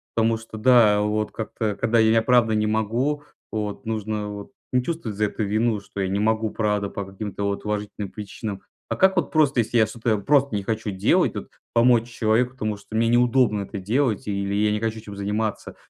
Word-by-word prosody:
потому 115 0 +2
что, 110 0 -10
да, 110 -3 +5
вот 105 +1 -1
как-то, 110 -1 -3
когда 115 +3 +1
я, 110 0 +4
правда, 120 -3 +3
могу, 115 +7 0 0.3
вот, 105 +3 -4
нужно 110 -1 -3
вот 100 +2 -8 0.2
не 125 0 +3
чувствовать 125 -9 -4
за 105 - +2
это 105 +1 -3
вину, 110 +2 +1
что 100 0 -7
я 95 - 0
не 95 +2 -1
могу, 110 +1 +1
правда, 105 -2 -1
по 100 - -5
каким-то 100 +1 -6
вот 100 0 -2
уважительным 105 -1 -4
причинам. 105 -1 -6 0.3
А - - -1
как 190 0 +3
вот 175 - 0
просто, 145 -5 +3
если 120 +1 +1
я 110 - +5
что-то 110 -1 -1
просто 140 +3 +2
не 100 - -2
хочу 110 0 -2
делать, 95 -1 +2
вот, - - -6 0.2
помочь 120 0 +4
человеку, 120 +2 +1
потому 110 -4 -3
что 105 +2 -10
мне 115 +1 +2
неудобно 120 -3 +3
это 100 +1 -6
делать 110 +3 0
или 100 -1 -2
я 105 +1 +2
не 105 - 0
хочу 110 0 -2
этим 105 -2 -10
заниматься, 105 +2 -3
110 Hz, 200 wpm, -23 LUFS, 105-115 Hz, 0.3 s, да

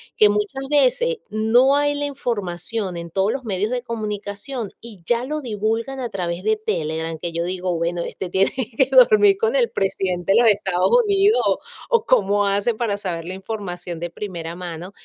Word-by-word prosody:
que 210 -1 +6
muchas 210 +7 -2
veces 300 - +2
no 235 +6 +4
hay 290 0 +2
la 290 0 -2
información 205 - -3
en 170 0 -6
todos 195 +5 +1
los 265 -3 -5
medios 205 +2 -1
de 250 -1 -1
comunicación, 215 +1 -4
y 215 -6 -12
ya 240 0 +1
lo 305 +2 -3
divulgan 225 +3 -2
a 240 -2 -3
través 180 -2 -4
de 220 0 +2
Telegram, 165 -6 -3
que 170 +2 -4
yo 170 +1 -2
digo: 180 0 -2
"Bueno, 170 +1 -1
este 185 - -6
tiene 190 +2 +2 0.3
que 265 - +4
dormir 430 -5 +6
con 455 +2 +1
el - - +2
presidente 190 -1 0
de - - +5
los 230 - +6
Estados 190 -3 0
Unidos", 405 +2 +3 0.5
o 470 -2 +2
cómo 205 -4 +3
hacen 205 +3 +1
para 215 -4 -1
saber 170 -4 -4
la 185 - -5
información 185 -4 -6
de 175 0 -5
primera 170 -5 -5
mano. 175 +1 -7
205 Hz, 185 wpm, -21 LUFS, 180-250 Hz, 0.5 s, que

